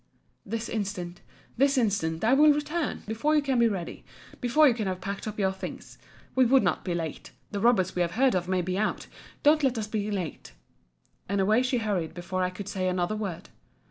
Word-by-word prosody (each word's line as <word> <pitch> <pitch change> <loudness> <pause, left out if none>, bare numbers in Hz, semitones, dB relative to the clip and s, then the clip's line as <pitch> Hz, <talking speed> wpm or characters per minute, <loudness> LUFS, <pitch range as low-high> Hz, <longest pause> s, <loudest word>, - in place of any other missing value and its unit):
This 230 +3 -4
instant, 190 -5 -4 0.4
this 275 +2 +3
instant, 195 -8 0
I 230 +4 +4
will 300 +2 +7
return—before 295 -3 -1
you 300 - +4
can 265 -3 +1
be 235 - +5
ready—before 235 - 0
you 255 - +4
can 220 -3 -3
have 185 -1 -2
packed 200 +3 -5
up 215 - -5
your 190 -2 +2
things—we 190 +6 -4
would 260 +2 +5
not - - 0
be 175 -3 -2
late—the 170 +5 -6
robbers 200 -5 +3
we 180 - +1
have 175 0 0
heard 260 +4 +3
of 180 -1 -1
may 185 -1 +1
be 185 +2 -2
out—don't 295 +7 0
let 260 -4 +1
us 220 - -1
be 210 -1 -3
late. 180 - -5 0.8
And 200 0 0
away 215 +5 +3
she 255 0 0
hurried 195 -8 -2
before 185 +1 -3
I 180 - +1
could 185 +2 -8
say 185 -2 -2
another 180 +2 0
word. 195 -4 -5
205 Hz, 190 wpm, -27 LUFS, 185-245 Hz, 0.8 s, will